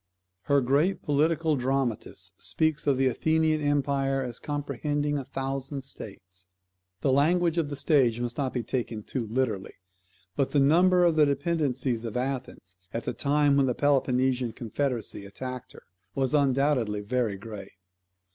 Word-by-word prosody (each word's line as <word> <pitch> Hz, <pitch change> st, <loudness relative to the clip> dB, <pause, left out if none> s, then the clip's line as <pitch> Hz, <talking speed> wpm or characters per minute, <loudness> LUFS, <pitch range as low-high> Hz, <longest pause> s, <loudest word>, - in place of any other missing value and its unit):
Her 140 Hz, -1 st, +3 dB
great 145 Hz, +9 st, +1 dB
political, 155 Hz, +2 st, +2 dB
dramatist 130 Hz, -3 st, -2 dB
speaks 155 Hz, -2 st, 0 dB
of 140 Hz, -2 st, +3 dB
the 135 Hz, -, +2 dB
Athenian 155 Hz, +4 st, +2 dB
empire 140 Hz, -2 st, +1 dB
as 125 Hz, -2 st, -5 dB
comprehending 145 Hz, 0 st, -2 dB
a -, -, -5 dB
thousand 135 Hz, +1 st, -4 dB
states. 95 Hz, -8 st, -10 dB, 0.5 s
The 135 Hz, -, +2 dB
language 170 Hz, +5 st, +3 dB
of 155 Hz, -3 st, -1 dB
the 145 Hz, -, -4 dB
stage 130 Hz, -6 st, +3 dB
must 120 Hz, -1 st, -3 dB
not 135 Hz, -1 st, -1 dB
be 125 Hz, -, -2 dB
taken 115 Hz, -2 st, -3 dB
too 120 Hz, -1 st, -3 dB
literally; 110 Hz, -4 st, -2 dB, 0.6 s
but 135 Hz, -, 0 dB
the 145 Hz, -, +4 dB
number 180 Hz, +6 st, +5 dB
of 170 Hz, -2 st, +3 dB
the 150 Hz, -1 st, +6 dB
dependencies 140 Hz, -5 st, 0 dB
of 115 Hz, 0 st, -4 dB
Athens, 125 Hz, -8 st, -4 dB
at 115 Hz, -, -3 dB
the -, -, -2 dB
time 145 Hz, 0 st, +2 dB
when 135 Hz, -1 st, +3 dB
the 125 Hz, -, 0 dB
Peloponnesian 130 Hz, -3 st, +1 dB
confederacy 120 Hz, -2 st, -3 dB
attacked 125 Hz, +5 st, -7 dB
her, -, -, -14 dB, 0.3 s
was 135 Hz, -1 st, 0 dB
undoubtedly 135 Hz, -6 st, +2 dB
very 115 Hz, -2 st, -1 dB
great. 100 Hz, -1 st, -9 dB
135 Hz, 150 wpm, -27 LUFS, 120-145 Hz, 0.6 s, the